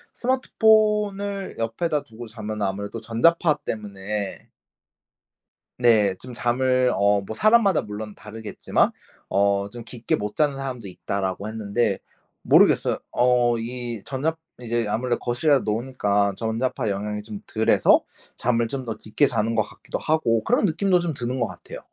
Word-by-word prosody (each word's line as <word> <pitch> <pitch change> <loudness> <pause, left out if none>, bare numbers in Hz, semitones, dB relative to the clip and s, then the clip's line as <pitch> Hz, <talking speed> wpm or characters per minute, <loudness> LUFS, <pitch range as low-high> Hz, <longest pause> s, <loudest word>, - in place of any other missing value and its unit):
스마트폰을 210 -5 +1
옆에다 145 +7 -1
두고 115 -1 -11
자면은 110 -1 -5
아무래도 100 +3 -3
전자파 150 +8 +2
때문에 105 -1 -5 1.3
네. 110 -5 +4
좀 125 0 -9
잠을 125 +1 +2
어 100 0 +3
뭐 110 +3 -7
사람마다 215 -2 +4
물론 105 0 -7
다르겠지만 110 0 -1 0.4
어 100 +1 +2
좀 120 +1 -8
"깊게 120 0 -2
못 105 0 -5
자는 145 -3 +2
사람도 130 -6 -5
있다."라고 95 +2 -3
했는데 110 -1 -1 0.4
모르겠어요. - - +4
어 120 -1 +3
이 120 -1 -5
전자 150 +4 -2 0.2
이제 120 -2 -1
아무래도 120 +3 -1
거실에다 140 +4 +2
놓으니까 105 -4 0
전자파 115 +1 -1
영향이 105 +1 -3
좀 105 -1 -8
덜 110 0 0
해서 - - +5 0.3
잠을 115 -1 +1
좀 130 +1 -4
더 110 - -4
깊게 110 +8 +1
자는 115 -2 0
것 110 - +3
같기도 105 - -6
하고 115 -8 +1
그런 245 -2 +2
느낌도 180 +1 +2
좀 170 -2 -2
드는 130 -1 -3
것 120 - +1
같아요. - - -10
115 Hz, 315 characters per minute, -24 LUFS, 105-135 Hz, 1.3 s, 해서